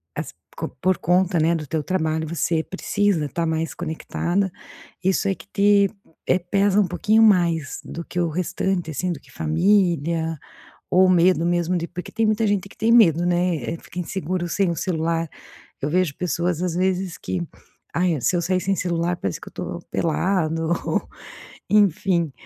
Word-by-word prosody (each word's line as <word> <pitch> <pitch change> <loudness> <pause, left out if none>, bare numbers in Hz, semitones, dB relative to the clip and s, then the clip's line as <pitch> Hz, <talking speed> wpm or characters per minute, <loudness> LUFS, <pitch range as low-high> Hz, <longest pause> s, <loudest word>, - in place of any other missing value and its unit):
as - - -5 0.2
co - - -4
por 185 -1 +2
conta, 180 +1 +2
né, 165 +2 +3
do 155 -3 -4
teu 155 +2 -2
trabalho, 160 -2 -1
você 165 0 0
precisa 195 -3 0
estar 165 +4 -2
mais 160 0 -1
conectada, 175 +3 -2 0.5
isso 190 +1 +1
é 195 - +1
que - - -14
te, 200 0 +4 0.4
eh, 180 - +3
pesa 200 +3 +2
um 200 - +3
pouquinho 210 +6 +2
mais 170 -8 +2
do 170 - -7
que 180 - -4
o 170 -1 +1
restante, 180 +1 -1
assim, 180 +4 -2
do 165 - -5
que - - -21
família 165 -1 +1 0.5
ou 185 +1 +5
medo 175 -1 +4
mesmo 175 +1 +1
de 170 -1 -2
porque 180 +1 -7
tem 225 - +1
muita 215 +1 +2
gente 200 -2 0
que - - -18
tem 225 +2 +1
medo, 175 -8 +5
né, 175 -1 +1 0.2
eh, - - -5
fica 180 - -7
inseguro 175 0 -3
sem 195 +2 +1
o - - -1
celular. 165 -1 -1 0.5
Eu 140 - -1
vejo 175 -3 +1
pessoas, 175 -1 -1
às 180 -2 -1
vezes 185 0 0
que: 185 - -3 0.5
"Ai, 170 -4 +1
se 155 - +1
eu 175 - 0
sair 185 +2 +1
sem 195 +2 0
celular, 175 0 -1
parece 95 - -4
que - - -10
eu - - -20
tô - - -5
pelado", 165 -1 0
ou, - - -1 0.6
enfim. 185 -5 +3
175 Hz, 180 wpm, -23 LUFS, 165-190 Hz, 0.6 s, ou